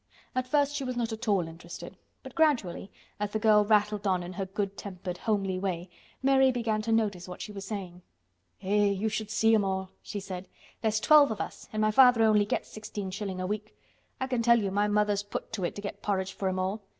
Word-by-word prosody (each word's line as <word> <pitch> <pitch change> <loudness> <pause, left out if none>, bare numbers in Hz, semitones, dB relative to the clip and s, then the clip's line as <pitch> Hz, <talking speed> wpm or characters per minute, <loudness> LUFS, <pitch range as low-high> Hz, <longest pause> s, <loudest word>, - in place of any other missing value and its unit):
At 255 0 -1
first 285 +1 +2
she 285 - -2
was 255 -1 -3
not 230 -2 -1
at 225 +2 -6
all 195 -5 +2
interested, 170 +1 -9 0.3
but - - -10
gradually, 255 - +1 0.3
as 210 0 -1
the - - +2
girl 215 -1 +5
rattled 210 -1 +2
on 185 -2 +1
in 175 +1 -7
her 190 +1 -3
good 195 0 -3
tempered, 185 -2 -6
homely 195 -4 0
way, 180 -2 -3 0.3
Mary 265 -1 +5
began 225 -3 -1
to 225 +1 -2
notice 205 -6 +1
what 180 - -8
she 210 - -6
was 195 -1 -7
saying. 190 -4 -6 0.6
"Eh! 205 +2 +3
you 200 +2 +1
should 215 0 -3
see 225 +1 +3
'em 215 -2 +4
all," 190 -1 -2
she 205 - -5
said. 190 -1 -7 0.3
"There's 220 -1 +1
twelve 295 +3 +6
of 220 - -4
us - - -6
an' 215 - -1
my 215 0 +3
father 250 -1 +6
only 210 -2 +4
gets - - -2
sixteen 205 -3 -6
shilling 190 -1 -4
a 185 - -2
week. 210 +2 -4 0.4
I 260 - 0
can 250 -3 -1
tell 235 0 +5
you 200 -3 -1
my 205 +2 +2
mother's 210 -1 +2
put 205 +2 -6
to 200 -4 -3
it - - -3
to 205 - -6
get 200 0 -6
porridge 195 -2 -1
for 190 - -1
'em 185 - -2
all. 190 +3 -1
205 Hz, 230 wpm, -29 LUFS, 190-220 Hz, 0.6 s, twelve